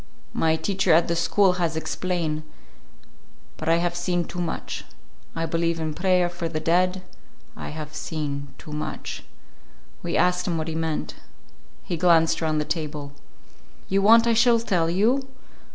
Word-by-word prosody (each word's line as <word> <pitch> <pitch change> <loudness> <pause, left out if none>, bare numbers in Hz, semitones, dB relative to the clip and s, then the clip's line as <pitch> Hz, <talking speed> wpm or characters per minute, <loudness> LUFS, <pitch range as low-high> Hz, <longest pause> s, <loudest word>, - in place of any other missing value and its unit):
My 160 0 +2
teacher 190 +1 0
at 165 +1 +5
the 170 - 0
school 185 +3 +3
has 165 -2 0
explain. 160 -1 -2 1.2
But - - -3
I 165 - +5
have 175 0 0
seen 175 0 0
too 175 - -5
much. 170 - -4 0.5
I 165 - -1
believe 165 +1 0
in 155 -1 -2
prayer 180 +1 +2
for 175 -1 -4
the 155 -1 -2
dead. 180 +3 +1 0.5
I - - -6
have 150 0 -7
seen 145 -2 -4
too 150 - -11
much." 150 - -5 0.8
We - - -1
asked 180 0 +2
him 170 -2 0
what 160 +1 -2
he - - -3
meant. 160 - -2 0.7
He 175 - -3
glanced 165 -1 +4
around 155 -1 +1
the 150 - 0
table. 150 -3 -4 0.8
"You 195 +1 +2
want 230 +3 +7
I 235 - +3
shall 235 +1 +5
tell 175 -7 +1
you? 235 +10 +2
170 Hz, 160 wpm, -24 LUFS, 160-180 Hz, 1.2 s, want